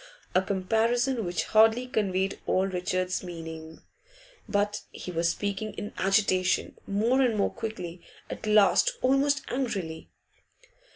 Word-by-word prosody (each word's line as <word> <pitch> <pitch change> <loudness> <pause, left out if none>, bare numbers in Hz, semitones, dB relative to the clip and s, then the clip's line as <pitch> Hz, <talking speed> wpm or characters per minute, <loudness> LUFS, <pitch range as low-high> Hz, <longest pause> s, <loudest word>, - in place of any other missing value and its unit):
A 185 - +4
comparison 225 +6 +1
which 175 -1 -1
hardly 225 +3 +4
conveyed 195 -5 -1
all 190 - +2
Richard's 185 0 -2
meaning; 160 -2 -8 0.7
but 205 0 0
he 180 - -8
was 170 0 +1
speaking 205 +3 -3
in 205 - -6
agitation, 190 -2 +1
more 225 +7 +2
and 240 -4 +2
more 200 - +1
quickly, 180 -7 -6 0.3
at - - -7
last 215 - +5
almost 275 +2 +3
angrily. 195 -11 -3
200 Hz, 120 wpm, -27 LUFS, 185-225 Hz, 0.7 s, last